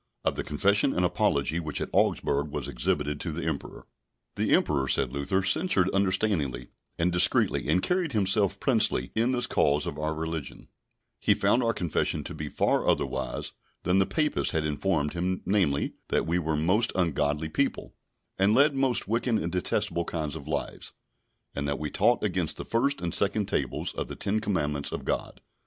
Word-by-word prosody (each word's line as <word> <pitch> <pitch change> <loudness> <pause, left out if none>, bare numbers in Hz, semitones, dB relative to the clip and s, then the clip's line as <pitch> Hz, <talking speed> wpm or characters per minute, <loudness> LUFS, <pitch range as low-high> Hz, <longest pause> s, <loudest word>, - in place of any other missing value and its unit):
Of - - +2
the - - -3
Confession 100 - +2
and 90 - +2
Apology 85 -5 +1
which 80 -3 -3
at - - -4
Augsburg 70 +2 +1
was 75 -2 -4
exhibited 75 +4 -1
to 85 - -3
the 80 +2 -4
emperor. 80 -3 -5 0.5
The - - 0
Emperor, 70 -3 +1
said 65 0 +1
Luther, 85 +8 -1
censured 95 - +2
understandingly 95 - 0 0.3
and 85 +2 +1
discreetly, 90 -5 +3
and 90 +4 +2
carried 180 -5 0
himself 100 -1 +2
princely 65 - +1
in 115 +3 +1
this 125 -1 0
cause 75 -9 +1
of - - -5
religion; 80 -1 -4 0.5
he - - +3
found 125 - +2
our 115 -1 +2
Confession 90 -7 -1
to - - -7
be - - -5
far - - +1
otherwise 65 0 -2 0.3
than 90 +2 +2
the 95 - +2
Papists 155 -2 0
had 80 -1 0
informed 75 0 -1
him—namely, 90 -3 0
that - - 0
we 85 +2 0
were 80 -2 -1
most 90 +9 +2
ungodly 75 -3 0
people, 80 - -2 0.5
and 100 +3 +4
led 140 +2 +4
most 135 -3 +1
wicked 115 +2 0
and 85 -5 -1
detestable 85 -1 -1
kind 80 -3 -3
of 75 -2 -9
lives; 75 -2 -4 0.6
and 70 0 -3
that 70 - -1
we 75 -1 -4
taught - - +2
against - - -1
the - - -6
first 140 +5 0
and 85 -1 -3
second 100 +1 +2
tables - - -2
of - - -4
the - - -7
Ten 105 +2 -1
Commandments 75 -9 -1
of - - -5
God. - - -3
85 Hz, 175 wpm, -27 LUFS, 75-105 Hz, 0.6 s, and